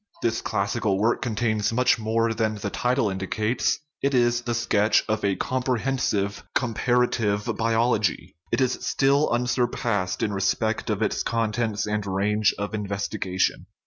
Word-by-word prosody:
This 115 -1 0
classical 100 0 0
work 110 +4 +1
contains 110 -2 0
much 125 +1 +3
more 115 +1 +1
than 110 -1 0
the 100 -1 -4
title 125 -1 +1
indicates; 105 +5 0 0.2
it 140 0 +1
is 120 -1 +3
the 120 -1 -2
sketch 110 -2 +2
of 110 0 -1
a 100 -1 +2
comprehensive 125 -5 -1
" - - -43
comparative 115 -3 +1
biology." 115 -6 0 0.2
It - - +1
is 130 -1 +1
still 140 +2 +2
unsurpassed 120 -5 0
in 105 - 0
re 100 - -2
spect 110 +3 0
of 105 0 0
its 110 - 0
contents 115 -1 -1
and 105 0 -1
range 100 +2 +2
of 105 +1 -4
investigation. 100 -2 -2
110 Hz, 145 wpm, -25 LUFS, 105-120 Hz, 0.2 s, much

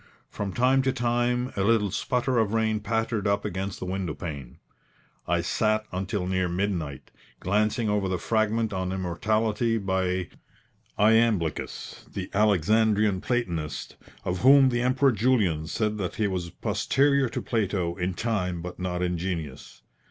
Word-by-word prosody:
From 100 -1 -4
time 130 +5 +3
to 130 0 +1
time 120 0 0
a 100 - -1
little 105 -2 +2
sputter 125 +3 0
of 110 0 +1
rain 110 -1 +1
pattered 110 -1 -1
up 100 0 +1
against 95 +1 -3
the - - -6
window 90 -4 -3
pane. 70 -5 -7 0.7
I 85 0 +2
sat 110 +4 0
until 95 +1 -2
near 95 -1 0
midnight, 85 -6 -3 0.3
glancing 105 +4 +1
over 105 -2 0
the 95 - 0
fragment 110 +1 0
on 95 -1 -2
immortality 110 +5 0
by 95 -2 -1 0.7
Iamblichus, 110 -6 +1
the 95 -1 -5
Alexandrian 105 0 +3
platonist, 85 - -3 0.3
of 90 0 -1
whom 135 +3 +7
the 120 -1 0
Emperor 130 +2 +3
Julian 105 -9 +1
said 105 +3 -1
that 90 -3 -3
he 110 - 0
was 90 -3 -2
posterior 140 +8 +1
to - - -3
Plato 100 -6 -1
in 90 -1 -2
time 90 -7 -2
but 90 0 -7
not 90 -1 -2
in 90 -1 -1
genius. 80 -7 -5
100 Hz, 145 wpm, -26 LUFS, 90-115 Hz, 0.7 s, whom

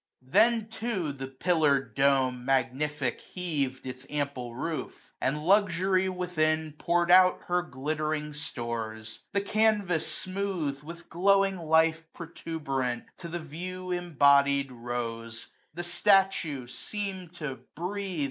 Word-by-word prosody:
Then, 225 - +3
too, 220 -10 -2
the 135 -1 -6
pillar'd 140 0 +1
dome, 135 -2 +2
magnific, 135 +2 0
heav 150 -8 -2
d 130 - -5
Its 130 +2 -13
ample 140 -5 -3
roof; 160 +5 -5
and 150 +3 0
Luxury 190 -1 +3
within 160 -4 0
135 150 - -30
Pour'd 175 0 +2
out 185 0 +7
her 180 0 +1
glittering 150 +1 -3
stores: 115 -6 -5
the 200 - +1
canvas 205 -5 +1
smooth^ 185 -7 -2
Witfi 170 +3 -10
glowing 195 +2 +3
life 160 0 +3
protuberant, 140 -7 -3
to 170 - -7
the 170 +1 -4
view 180 +4 -6
Embodied 140 -5 +3
rose; 115 -1 -5 0.3
the 175 - -4
statue 180 -7 +2
seem*d 190 - -5
to 140 -7 -5 0.2
breathe. 185 +1 -3
155 Hz, 120 wpm, -29 LUFS, 135-180 Hz, 0.3 s, out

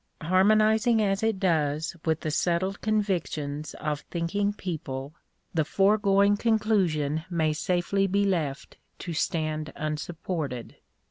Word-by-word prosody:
Harmonizing 215 +6 +4
as 195 -2 +1
it 220 -3 0
does 155 -4 0
with 160 -1 +1
the 155 - -2
settled 180 +5 0
convictions 160 -9 -1
of 150 -1 -2
thinking 190 +4 0
people, 150 -8 -5 0.4
the 160 - +2
foregoing 200 +4 +3
conclusion 190 -10 +1
may 160 -3 +1
safely 180 +5 0
be 200 +2 +2
left 155 -8 -2 0.2
to 175 - -5
stand 155 -2 -1
unsupported. 155 -4 -4
175 Hz, 115 wpm, -27 LUFS, 155-200 Hz, 0.4 s, Harmonizing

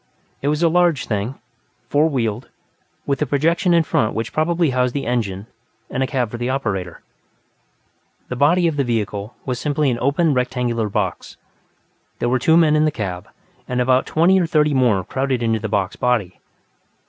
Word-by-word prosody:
It 140 - -2
was 150 +3 +1
a - - +5
large 170 -4 +2
thing, 105 +4 -2 0.5
four 150 +3 +2
wheeled, 115 -4 -2 0.6
with 140 0 -1
a 150 - +1
projection 165 +6 +1
in 170 -1 +4
front 110 -7 0
which 115 0 -3
probably 165 -1 +1
housed 125 0 0
the 140 - -2
engine 105 -5 -2 0.5
and 130 - -2
a 130 - +1
cab 130 -6 -1
for 120 - -5
the 120 +1 -2
operator. 100 -10 -3 1.2
The 125 - -4
body 170 +7 +3
of 155 -3 -2
the 140 - +2
vehicle 105 -3 -3
was 125 -2 -2
simply 145 -1 0
an 120 - -2
open 145 +4 +2
rectangular 125 -3 -1
box. 100 -3 -3 0.8
There 120 - -1
were 130 +1 +1
two 160 +6 +4
men 155 -3 +4
in 155 0 +3
the - - +3
cab, 95 -9 -5 0.4
and 125 0 -2
about 130 +1 +2
twenty 180 +4 +3
or 170 - 0
thirty 150 -2 +2
more 120 -8 +2
crowded 130 +2 -2
into 115 -1 +1
the 110 0 -4
box 100 -3 -1
body. 110 -8 -1
130 Hz, 185 wpm, -20 LUFS, 115-150 Hz, 1.2 s, a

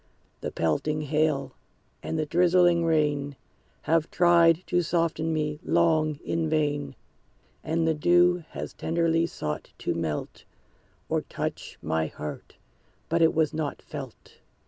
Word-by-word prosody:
The - - -4
pelting 115 - 0
hail 150 -1 0 0.5
and 160 - -3
the 155 - 0
drizzling 175 +1 +4
rain 145 -3 +1 0.5
Have 165 0 +1
tried 170 -1 +4
to 175 0 +1
soften 165 -1 0
me, 150 -1 -1
long, 160 -3 +2
in 165 -1 -1
vain; 145 -3 -1 0.7
And 165 0 0
the 160 - +3
dew 175 +3 +3
has - - -6
tenderly 165 0 +1
sought 75 - -5
to - - -2
melt, 80 -3 -4 0.6
Or - - 0
touch - - -5
my 80 0 0
heart; 75 0 -8 0.5
but 170 +1 +1
it 165 - +4
was 160 -2 +2
not 155 -2 -3
felt. 135 -6 -10
160 Hz, 130 wpm, -26 LUFS, 145-170 Hz, 0.7 s, drizzling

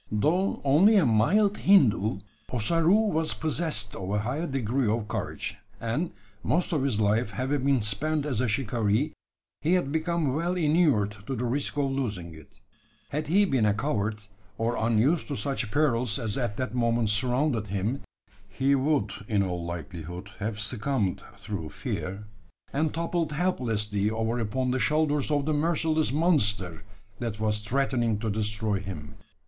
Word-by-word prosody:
Though 160 - +1
only 160 +11 +5
a 195 - +5
"mild 195 - +3
Hindoo," 110 - +4 0.3
Ossaroo 165 - +3
was 160 0 0
possessed 155 -10 -1
of 95 0 -5
a 105 - +1
high 130 +11 -2
degree 130 -2 0
of 110 0 0
courage; 100 -2 -4 0.2
and, 120 +10 -1 0.3
most 175 +10 +1
of 150 - +1
his 130 -6 0
life 105 +2 +2
having 130 +6 -1
been 135 -5 +3
spent 145 +9 0
as 130 -6 -1
a 125 - +1
shikaree, 115 +3 0 0.5
he 165 +4 +2
had 175 -7 +1
become 160 -3 0
well 170 +5 0
inured 150 - +2
to 135 - -2
the 125 +1 -2
risk 140 +4 -1
of 140 -2 +1
losing 105 -11 -3
it. 80 -2 -14 0.6
Had 150 +2 -3
he 200 +6 +4
been 130 - +2
a 100 - +2
coward, 110 -4 -1 0.4
or 115 +1 0
unused 115 +9 +2
to 145 - -3
such 130 -1 -2
perils 125 -5 +1
as 110 -5 -3
at 120 -5 -2
that 125 -4 -3
moment 115 -2 +1
surrounded 125 +1 +1
him, 100 +7 -2 0.5
he 135 +8 +1
would 135 -6 +1 0.2
in 100 -3 +2
all 90 -2 -3
likelihood 85 +2 -6
have 105 0 -3
succumbed 110 -2 -1 0.2
through 100 -5 -5
fear; 95 +6 -5 0.5
and 150 +2 +1
toppled 165 -1 -1
helplessly 110 - 0
over 115 +2 -1
upon 125 +3 -1
the 130 - 0
shoulders 150 -1 +1
of 145 -2 +1
the 155 - +1
merciless 160 0 +1
monster 110 - +1 0.4
that 115 -3 -4
was 105 -1 +1
threatening 120 0 0
to 110 0 -2
destroy 105 -1 -1
him. 90 -7 -7
120 Hz, 160 wpm, -27 LUFS, 105-150 Hz, 0.6 s, only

